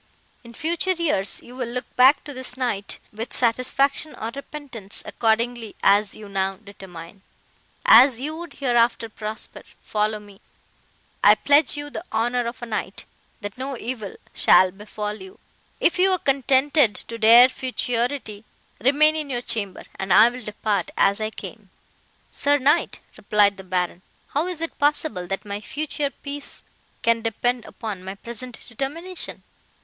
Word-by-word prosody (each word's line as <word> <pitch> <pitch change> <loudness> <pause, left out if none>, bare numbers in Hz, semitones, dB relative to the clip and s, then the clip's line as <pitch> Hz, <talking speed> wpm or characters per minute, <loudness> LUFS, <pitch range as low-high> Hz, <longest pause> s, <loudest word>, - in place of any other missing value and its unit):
In 235 - -12
future 340 +7 0
years, 300 - -1
you 245 - -13
will 250 -2 -3
look 250 +1 -6
back 260 +3 +6
to 290 - -8
this 255 -1 -6
night 220 -6 -2 0.2
with 225 +3 -5
satisfaction 265 +5 0
or 225 +1 -5
repentance, 275 -8 -8
accordingly 230 0 0
as 205 0 +4
you 215 - -10
now 195 -1 -1
determine. 190 -2 -12 0.6
As 245 +1 +8
you 300 +4 -4
would 340 -2 -8
hereafter 240 -3 +1
prosper—follow 215 0 -4
me; 205 -1 -16 0.8
I - - +8
pledge 290 +1 +3
you 290 0 -5
the 330 - -6
honour 240 +2 0
of 240 +1 -7
a - - -2
knight, 220 -2 -4 0.4
that 205 +3 -7
no 265 0 -3
evil 225 -4 -5 0.2
shall 185 0 +5
befall 210 +1 -6
you;—if 190 - -4
you 380 +1 +5
are - - +2
contented 275 - +3
to 230 0 -8
dare 235 +3 +9
futurity—remain 255 +3 0
in 305 -2 -3
your 245 -2 -2
chamber, 200 -6 0 0.2
and 190 0 -3
I 215 +6 +8
will 250 +1 -9
depart 210 0 -1
as 200 +2 +3
I 215 - 0
came.' 215 -2 -10 0.6
"'Sir 285 +1 +2
knight,' 290 +5 +2 0.2
replied 200 -1 +3
the 190 - -9
Baron, 180 -1 -2 0.3
'how 300 +5 0
is 355 -3 -4
it 330 - -4
possible, 290 - 0
that 195 +3 -4
my 205 0 -4
future 285 +4 -3
peace 280 +1 -7 0.4
can 230 0 +3
depend 235 +2 -1
upon 205 -5 -6
my 190 +1 -6
present 235 +3 -8
determination? 315 +10 -5
235 Hz, 150 wpm, -23 LUFS, 210-280 Hz, 0.8 s, dare